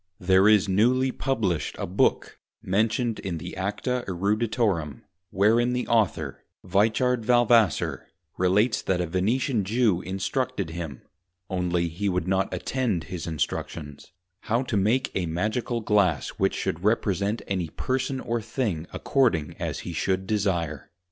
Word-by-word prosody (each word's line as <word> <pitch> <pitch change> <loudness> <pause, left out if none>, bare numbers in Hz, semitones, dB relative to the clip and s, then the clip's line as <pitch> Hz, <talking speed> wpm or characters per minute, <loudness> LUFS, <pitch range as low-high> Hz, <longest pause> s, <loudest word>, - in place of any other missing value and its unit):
There 95 +2 +4
is 105 -2 +5
newly 125 +7 +3
Published 110 - -1
a - - -3
Book 90 +3 0 0.2
(mentioned 110 +4 0
in 90 -3 -4
the 80 - -7
Acta 105 +7 -2
Eruditorum) 100 - 0 0.3
wherein 115 +6 +3
the 125 0 -2
Author 110 -5 0 0.2
(Wiechard 110 +6 +2
Valvassor) 120 -5 +3 0.3
relates, 105 +5 +2
that 95 -2 0
a 90 - 0
Venetian 110 - 0
Jew 105 -3 +2
instructed 95 +3 -2
him 80 -6 -6 0.5
(only 90 -2 0
he 90 +5 -2
would 90 -1 -1
not 95 +1 +1
attend 100 -1 -1
his 90 -2 -6
Instructions) 75 -1 -4 0.3
how 115 +6 0
to 125 - -3
make 110 +7 +2
a 90 -3 -1
Magical 110 +8 -1
Glass 100 -8 +2
which - - 0
should 85 +3 -3
represent 105 0 +1
any 90 -4 -2
Person 130 +7 -2
or 120 -2 -2
thing 105 - -2
according 110 - +1
as - - -3
he 85 - -6
should 95 +3 -1
desire. 85 -9 -1
100 Hz, 135 wpm, -26 LUFS, 90-115 Hz, 0.5 s, is